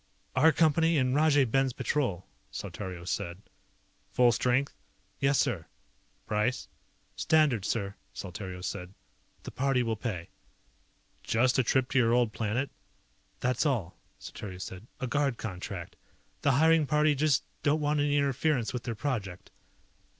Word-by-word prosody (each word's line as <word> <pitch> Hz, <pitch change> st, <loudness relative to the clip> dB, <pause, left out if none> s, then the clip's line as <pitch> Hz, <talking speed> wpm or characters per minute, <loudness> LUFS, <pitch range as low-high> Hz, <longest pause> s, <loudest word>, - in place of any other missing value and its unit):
"Our 155 Hz, +5 st, +6 dB
Company 165 Hz, +1 st, +3 dB
and 130 Hz, -2 st, +2 dB
Rajay 145 Hz, -1 st, +4 dB
Ben's 135 Hz, +2 st, +1 dB
Patrol," 120 Hz, -, -1 dB, 0.2 s
Saltario 90 Hz, -3 st, -6 dB
said. 90 Hz, -1 st, -3 dB, 0.7 s
"Full 125 Hz, -1 st, +4 dB
strength?" 125 Hz, +4 st, +1 dB, 0.4 s
"Yes, 140 Hz, 0 st, +3 dB
sir." 85 Hz, -5 st, 0 dB, 0.6 s
"Price?" 105 Hz, +4 st, 0 dB, 0.5 s
"Standard, 145 Hz, -10 st, +2 dB
sir," 100 Hz, -4 st, -1 dB, 0.2 s
Saltario 95 Hz, -1 st, -7 dB
said. 90 Hz, 0 st, -5 dB, 0.5 s
"The -, -, -7 dB
party 135 Hz, -1 st, +1 dB
will 115 Hz, -1 st, -1 dB
pay." 100 Hz, -7 st, -4 dB, 0.9 s
"Just 125 Hz, +3 st, +2 dB
a -, -, +4 dB
trip 130 Hz, +2 st, +2 dB
to 135 Hz, -, +3 dB
your 115 Hz, -1 st, +3 dB
old 120 Hz, -3 st, +2 dB
planet?" 115 Hz, +5 st, -1 dB, 0.7 s
"That's 125 Hz, 0 st, +1 dB
all," 115 Hz, -, -1 dB, 0.2 s
Saltario 95 Hz, -3 st, -8 dB
said. 95 Hz, +3 st, -8 dB
"A -, -, -2 dB
guard 140 Hz, -1 st, 0 dB
contract. 95 Hz, -3 st, -6 dB, 0.4 s
The 140 Hz, -, +3 dB
hiring 160 Hz, +2 st, +4 dB
party 150 Hz, 0 st, +3 dB
just 145 Hz, 0 st, +2 dB, 0.2 s
don't 150 Hz, +2 st, +2 dB
want 150 Hz, 0 st, +1 dB
any 145 Hz, 0 st, +2 dB
interference 140 Hz, -3 st, +1 dB
with 125 Hz, -, -3 dB
their 115 Hz, -, -3 dB
project." 105 Hz, -8 st, -4 dB
125 Hz, 135 wpm, -29 LUFS, 105-145 Hz, 0.9 s, Our